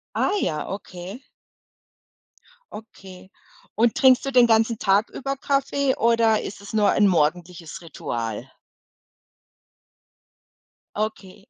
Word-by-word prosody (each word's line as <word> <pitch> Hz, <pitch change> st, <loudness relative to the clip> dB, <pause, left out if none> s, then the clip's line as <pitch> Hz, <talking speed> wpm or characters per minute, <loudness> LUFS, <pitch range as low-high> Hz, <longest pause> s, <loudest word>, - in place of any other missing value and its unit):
Ah -, -, +1 dB
ja, 155 Hz, -1 st, -2 dB
okay. 195 Hz, +3 st, -8 dB, 1.5 s
Okay, 190 Hz, -4 st, -12 dB, 0.5 s
und 230 Hz, +1 st, +2 dB
trinkst 260 Hz, -1 st, +4 dB
du 275 Hz, -, -2 dB
den 250 Hz, -2 st, +5 dB
ganzen 225 Hz, 0 st, +2 dB
Tag 200 Hz, +2 st, +2 dB
über 275 Hz, +1 st, -4 dB
Kaffee 275 Hz, 0 st, 0 dB
oder 230 Hz, -1 st, +3 dB
ist 200 Hz, -, -8 dB
es 200 Hz, -, -10 dB
nur 210 Hz, -2 st, +2 dB
ein 205 Hz, -, +3 dB
morgendliches 170 Hz, 0 st, -1 dB
Ritual? 115 Hz, -9 st, -5 dB, 2.5 s
Okay. 205 Hz, -3 st, -5 dB
210 Hz, 105 wpm, -23 LUFS, 180-235 Hz, 2.5 s, den